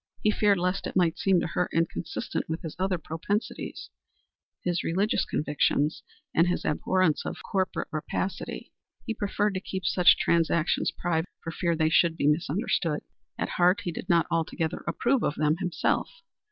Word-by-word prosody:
He 215 - +4
feared 205 -2 +3
lest 180 +2 -1
it - - -7
might 175 -3 +2
seem 190 -2 +3
to - - -1
her 175 +1 -1
inconsistent 165 0 -2
with 160 +1 -3
his 160 - -6
other 190 -1 +1
propensities 205 - -4 0.7
his 175 -1 0
religious 195 +6 +1
convictions 150 0 0 0.3
and 165 +2 +4
his 180 - -1
abhorrence 175 +1 +1
of - - -6
corporate 190 -1 -1
rapacity. 170 +4 -4 0.3
He 225 - -1
preferred 205 0 0
to 185 - -1
keep 190 0 -5
such 180 -2 +5
transactions 165 -1 +2
private 170 0 -1
for 165 - -4
fear 170 0 0
they 160 0 +2
should 165 0 +3
be - - 0
misunderstood. 155 +1 +1 0.4
At - - -2
heart 180 +3 +3
he 175 - -3
did 180 - -7
not 170 -1 +4
altogether 165 0 -1
approve 250 0 +1
of 145 - 0
them 155 +1 +2
himself. 180 -4 0
175 Hz, 165 wpm, -27 LUFS, 160-190 Hz, 0.7 s, such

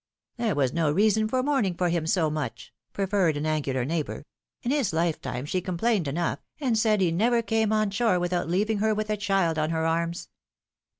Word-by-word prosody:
There 230 -6 0
was 135 -3 +1
no 160 -3 +1
reason 215 +5 +3
for 255 +3 0
mourning 260 -11 +1
for 180 0 0
him 165 -2 -1
so 160 -3 +2
much," 145 -7 -5 0.2
proffered 190 -5 +1
an 145 - -3
angular 140 -5 -1
neighbor. 155 0 -3 0.4
^'In 245 - +1
his 275 - +1
lifetime 160 -6 -1
she 180 +5 -1
com 180 -1 -4
plained 210 -5 +1
enough, 165 +5 -1 0.2
and 260 -6 +1
said 215 -2 +2
he 175 -3 +3
never 230 +7 +2
came 220 -1 +1
on 215 -2 +1
shore 200 -3 +2
without 175 -1 -1
leaving 205 +4 +1
her 220 +1 +2
with 215 0 -2
a 210 - 0
child 195 -6 +1
on 155 0 0
her 160 0 -1
arms 170 +1 -1
180 Hz, 200 wpm, -26 LUFS, 160-215 Hz, 0.4 s, reason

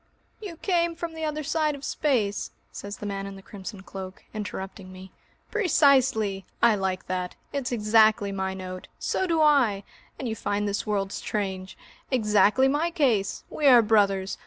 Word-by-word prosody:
"You 390 -6 -7
came 340 -2 0
from 335 0 -5
the 320 0 -4
other 305 0 -3
side 305 0 0
of 280 - -8
space!" 225 -9 0 0.2
says 200 0 -7
the - - -7
man 195 -1 -4
in 195 - -8
the 195 - -12
crimson 195 0 -9
cloak, 190 -1 -8
interrupting 195 -2 -6
me. 185 0 -11 0.4
"Precisely! 265 - +3 0.2
I 235 -1 +5
like 190 -2 -2
that 180 -1 -3 0.2
it's 275 -4 -2
exactly 215 -2 +3
my 190 -1 -2
note! 185 -1 -7
So 375 - -1
do 330 -2 +2
I! 250 -10 +3 0.3
And 260 - -4
you 220 - -2
find 205 -1 -1
this 205 +2 -2
world 195 -2 -1
strange! 190 -3 -4 0.3
Exactly 215 +1 +3
my 295 +5 +1
case! 255 - 0
We 295 - +1
are 245 -3 +8
brothers! 200 -3 +2
210 Hz, 165 wpm, -26 LUFS, 195-280 Hz, 0.4 s, are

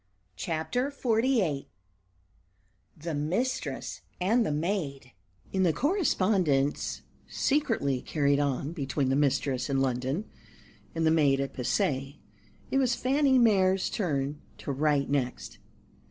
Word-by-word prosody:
CHAPTER 165 - -2
XLVIII 230 - 0 1.3
"THE 160 +1 -5
MISTRESS 180 - -2 0.2
AND 220 +7 +3
THE 210 - -1
MAID" 150 -5 -2 0.4
IN 190 - +1
the 175 -4 +3
correspondence 185 - +1 0.3
secretly 225 - 0
carried 140 -2 +1
on 140 0 -1
between 140 -3 -1
the 135 - +2
mistress 135 -2 +1
in 135 -1 +1
London 135 - -1 0.7
and 165 0 0
the 160 - +4
maid 145 -4 +3
at 140 0 -2
Passy, 135 +2 -1 0.5
it 270 - +3
was 250 -3 +2
Fanny 270 +1 +3
Mere's 195 -5 +3
turn 145 - -2 0.2
to - - -5
write 145 0 +1
next. 125 - -2
150 Hz, 115 wpm, -28 LUFS, 140-215 Hz, 1.3 s, the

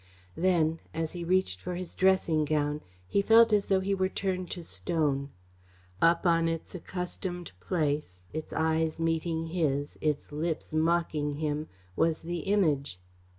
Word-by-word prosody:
Then, 165 -3 +2 0.2
as 160 -1 -1
he 175 -1 -5
reached 170 - +1
for 180 - -4
his 180 0 -5
dressing 185 -5 +3
gown, 150 0 0 0.3
he 200 - +2
felt 225 +2 +6
as 205 -1 +3
though 190 -1 +3
he 195 +1 0
were 190 -1 +1
turned 185 -2 -2
to 175 - -5
stone. 150 -5 -1 0.7
Up 170 +2 +4
on 165 -1 +4
its 165 -1 -3
accustomed 180 0 -4
place, 145 - -1
its 155 0 -5
eyes 160 0 +1
meeting 165 0 0
his, 145 -5 -1
its 150 -2 -1
lips 155 +1 -3
mocking 155 -2 +1
him, 150 0 -2 0.3
was 160 - +1
the 175 +1 -3
Image. 155 - +1
165 Hz, 150 wpm, -29 LUFS, 155-180 Hz, 0.7 s, felt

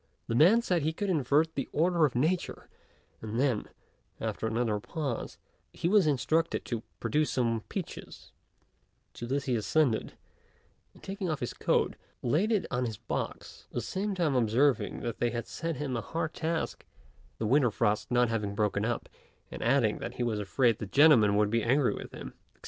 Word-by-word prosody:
The - - -3
man 185 - +5
said 180 -6 +1
he 155 +2 0
could 200 +3 -2
invert 155 +1 +2
the 135 - -3
order 170 +1 +3
of 125 - -9
nature; 160 +8 -1 0.5
and 110 +1 -4
then, 130 -5 +1 0.5
after 110 - -2
another 110 -2 0
pause, 140 0 -4 0.4
he - - -2
was 195 -3 +4
instructed 155 +4 +1
to 115 -3 -3 0.2
produce 150 0 +1
some 115 -3 0
peaches; - - -7 0.8
to 120 - -7
this 135 +2 -1
he 130 -4 +1
assented; 120 +1 +1 0.8
and - - -19
taking 195 -2 -4
off 155 -3 -1
his 120 - -3
coat, - - +1 0.3
laid 160 - +2
it 210 -4 +2
on 125 -1 0
his 110 -3 -4
box, - - -5
at - - -19
the - - 0
same 195 +1 -2
time 165 -6 +1
observing 125 +2 +2
that 115 -2 -4
they 120 - +2
had 115 -1 -4
set 165 0 -4
him 135 -2 -3
a 115 - -1
hard 160 +3 -3
task, 165 0 -2 0.5
the 110 - -2
winter 130 +2 +4
frost 105 -1 0
not 120 0 +3
having 105 -3 -2
broken 105 -1 0
up, 115 +1 -2 0.4
and - - -7
adding 120 -2 +2
that - - -6
he 125 - -2
was 110 -3 -1
afraid 115 +3 +1
the 110 - -5
gentlemen 120 -6 +6
would 105 0 +2
be 115 0 +2
angry 130 +4 +2
with - - -8
him, - - -8
&c. - - -22
130 Hz, 185 wpm, -29 LUFS, 115-160 Hz, 0.8 s, gentlemen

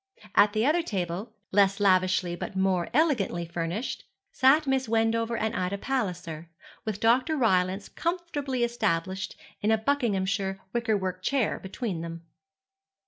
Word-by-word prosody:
At 205 0 +5
the 220 +1 +1
other 315 +5 +3
table, 195 - -4 0.2
less 195 0 +4
lavishly 185 -2 +3
but 185 - -6
more 190 -2 +1
elegantly 240 - +1
furnished, 170 +7 -3 0.3
sat 290 +3 +4
Miss 265 -3 0
Wendover 230 +1 +1
and 220 0 -1
Ida 185 +2 -1
Palliser, 175 -10 -3 0.4
with 215 -2 -3
Dr. 255 +7 +3
Rylance 190 -5 +2
comfortably 305 -7 -2
established 195 -5 -1 0.3
in 210 - +1
a 220 - +4
Buckinghamshire 200 -6 0
wickerwork 205 -6 -1
chair 260 +3 0
between 190 -2 -4
them. 165 0 -7
205 Hz, 130 wpm, -27 LUFS, 185-245 Hz, 0.4 s, At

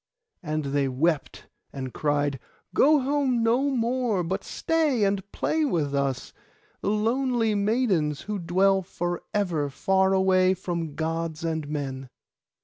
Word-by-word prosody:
And 155 -3 -2
they 140 -1 +2
wept 145 +4 -1 0.3
and 130 -2 -6
cried, 145 -2 0 0.3
'Go 300 0 +5
home 265 -3 +1
no 245 +5 +2
more, 240 -5 0
but 190 +4 -3
stay 310 -8 0
and 195 -1 +1
play 315 0 0
with 160 - 0
us, 140 -2 -1 0.5
the - - -1
lonely 230 +1 +1
maidens, 200 - +1
who 210 -1 -4
dwell 190 +3 +2
for 175 -1 -4
ever 170 -8 0
far 190 +7 +2
away 190 -1 +3
from 170 -4 -4
Gods 165 0 -3
and 160 -2 -2
men. 135 -3 -4
185 Hz, 135 wpm, -26 LUFS, 155-225 Hz, 0.5 s, Go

